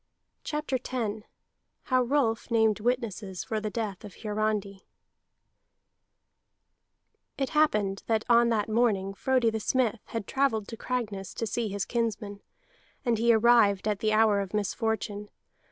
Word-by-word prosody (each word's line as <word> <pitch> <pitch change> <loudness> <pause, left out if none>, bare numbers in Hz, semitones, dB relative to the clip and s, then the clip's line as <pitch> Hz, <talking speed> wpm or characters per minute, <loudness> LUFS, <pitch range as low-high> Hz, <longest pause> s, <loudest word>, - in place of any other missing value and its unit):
CHAPTER 300 -4 -2
X 220 -4 -2 0.6
HOW 255 -1 +2
ROLF 245 -3 0
NAMED 220 -2 +3
WITNESSES 215 -5 -2
FOR 220 - -2
THE 215 0 -3
DEATH 210 -4 -4
OF 205 -3 -10
HIARANDI 210 -2 -2 2.5
It 270 -1 -1
happened 210 -11 +2
that 220 -1 +1
on 235 0 +5
that 215 -3 +1
morning 215 -4 +1
Frodi 250 +1 +1
the 220 - -2
Smith 235 0 +1
had 225 -3 -5
travelled 225 -6 0
to 230 - -6
Cragness 215 -7 -4
to 230 - -2
see 225 +1 -2
his 200 0 -2
kinsmen, 220 -4 -2 0.6
and 235 -3 +1
he 235 +1 +4
arrived 220 -3 +4
at 210 -2 0
the 215 - +1
hour 215 -1 +4
of 195 +1 -4
misfortune. 210 0 -2
220 Hz, 135 wpm, -28 LUFS, 205-235 Hz, 2.5 s, on